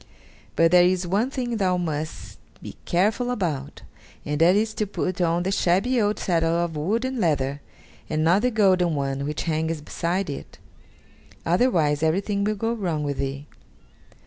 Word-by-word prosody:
But 165 0 +4
there 180 -1 +7
is 180 0 +2
one 200 +8 0
thing 245 -4 -3
thou 185 -3 +1
must 155 -3 -5 0.2
be - - -9
careful 210 +7 +1
about, 165 - -3 0.4
and 150 +1 -2
that 175 +3 +6
is 215 +1 +1
to 215 - -2
put 185 -2 -3
on 170 0 +1
the 190 - -1
shabby 200 +7 +2
old 210 0 +1
saddle 165 -2 +1
of 170 -1 -1
wood 205 +11 -1
and 260 -1 -3
leather, 145 -6 0 0.5
and 155 0 0
not 175 +5 +4
the 250 - +2
golden 185 -7 +3
one 140 -1 -2
which 150 +1 -3
hangs 160 0 -1
beside 175 +5 -2
it 140 - -7 0.9
otherwise 165 - +2
everything 200 +5 0
will 215 +1 0
go 225 +3 -1
wrong 175 -9 -2
with 145 -1 -3
thee." 140 +1 -3
175 Hz, 170 wpm, -24 LUFS, 155-205 Hz, 0.9 s, there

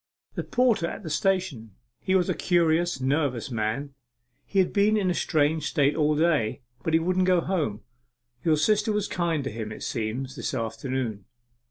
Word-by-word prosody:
'A - - -1
porter 240 -9 +2
at 210 - -7
the 160 - -5
station. 155 - -1 0.2
He 190 - 0
was 180 -2 +3
a - - +1
curious 170 -3 +2
nervous 135 -2 0
man. 115 +5 -2 0.5
He 200 - -4
had 190 -2 +3
been 210 +1 +3
in 190 -3 +1
a - - +1
strange 155 -2 +1
state 145 -2 +2
all 150 -1 +2
day, 150 -8 +1 0.2
but 160 - +1
he - - +5
wouldn't 185 +2 +1
go 180 -1 +4
home. 160 - -1 0.6
Your 160 -2 +3
sister 210 +6 +2
was 210 -1 0
kind 170 -4 -1
to 135 - -4
him, 110 -1 -5
it 110 - -8
seems, 125 +4 -3
this 125 +1 -3
afternoon. 115 -2 -3
155 Hz, 180 wpm, -26 LUFS, 130-180 Hz, 0.6 s, he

